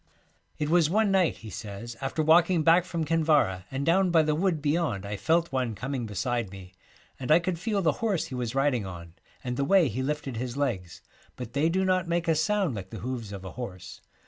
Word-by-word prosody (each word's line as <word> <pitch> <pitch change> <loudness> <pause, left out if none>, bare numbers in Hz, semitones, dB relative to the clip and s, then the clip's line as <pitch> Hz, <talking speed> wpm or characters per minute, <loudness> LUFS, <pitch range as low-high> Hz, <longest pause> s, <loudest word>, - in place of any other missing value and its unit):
It 150 - -1
was 165 -2 +4
one 210 +2 +2
night,' 190 -3 +2
he 110 - -7
says, 110 +3 -7
'after 135 +3 -1
walking 170 +1 +4
back 165 +2 +5
from 170 -3 -3
Kinvara 150 - +2
and 135 +1 -3
down 185 +3 +3
by 165 -2 +4
the 155 0 +1
wood 170 0 +1
beyond 145 - -1
I 105 +1 -4
felt 165 - +1
one 125 -4 -1
coming 125 +2 -4
beside 120 +1 -2
me, 95 -1 -11 0.5
and 130 - -5
I 155 - +8
could 175 -1 -2
feel 205 0 -1
the 160 - +4
horse 210 -7 0
he - - -9
was 125 -1 -3
riding 135 -5 +2
on 85 -3 -9 0.3
and 125 -1 -3
the 140 - +1
way 175 0 +4
he 125 +6 -3
lifted 140 -3 -3
his 125 +2 -4
legs, 100 - -3 0.3
but 120 -2 -8
they 145 +4 +2
do 190 +3 +1
not 185 -1 +1
make 170 0 -1
a 165 - +4
sound 175 +1 +1
like 95 -3 -6
the 110 -3 -8
hoofs 120 -3 -4
of 95 -2 -8
a 95 - -6
horse. 100 -8 -8
145 Hz, 225 wpm, -27 LUFS, 115-170 Hz, 0.5 s, I